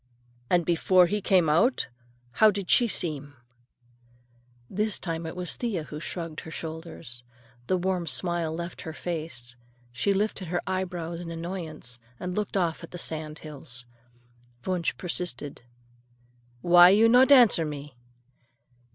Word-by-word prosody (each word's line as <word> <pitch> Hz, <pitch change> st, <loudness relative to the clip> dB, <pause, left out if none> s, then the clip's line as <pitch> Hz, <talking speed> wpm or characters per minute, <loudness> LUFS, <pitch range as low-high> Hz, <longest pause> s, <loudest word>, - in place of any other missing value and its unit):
"And 175 Hz, -2 st, +3 dB
before 180 Hz, +2 st, +4 dB
he 205 Hz, +4 st, -1 dB
came 185 Hz, -4 st, +3 dB
out, 200 Hz, -, +3 dB, 0.4 s
how 215 Hz, -, +6 dB
did 200 Hz, -2 st, -2 dB
she 240 Hz, -, +6 dB
seem?" 145 Hz, -8 st, -1 dB, 1.3 s
This 210 Hz, -, -1 dB
time 165 Hz, -2 st, -4 dB
it 160 Hz, -, -6 dB
was 180 Hz, -1 st, -4 dB
Thea 215 Hz, -10 st, -2 dB
who 150 Hz, 0 st, -8 dB
shrugged 165 Hz, -1 st, -5 dB
her -, -, -9 dB
shoulders. 160 Hz, -6 st, -6 dB, 0.4 s
The 185 Hz, -, +2 dB
warm 180 Hz, -1 st, -1 dB
smile 165 Hz, +4 st, 0 dB
left 170 Hz, +2 st, -5 dB
her 160 Hz, -, -6 dB
face. 155 Hz, -8 st, -5 dB, 0.4 s
She 125 Hz, +11 st, +1 dB
lifted 200 Hz, -2 st, -1 dB
her 175 Hz, +1 st, -2 dB
eyebrows 175 Hz, -3 st, -3 dB
in 175 Hz, -1 st, -7 dB
annoyance 165 Hz, -7 st, -6 dB, 0.2 s
and 180 Hz, 0 st, -4 dB
looked 210 Hz, -1 st, -1 dB
off 170 Hz, -3 st, 0 dB
at 170 Hz, -, -8 dB
the 175 Hz, -, -8 dB
sand 155 Hz, -2 st, -3 dB
hills. 130 Hz, -5 st, -6 dB, 0.8 s
Wunsch 180 Hz, -2 st, -1 dB
persisted. 165 Hz, -6 st, -3 dB, 1.0 s
"Why 175 Hz, 0 st, +8 dB
you 215 Hz, +4 st, +6 dB
not 250 Hz, +4 st, +6 dB
answer 240 Hz, -11 st, +7 dB
me?" 145 Hz, -3 st, -6 dB
170 Hz, 140 wpm, -27 LUFS, 155-185 Hz, 1.3 s, Why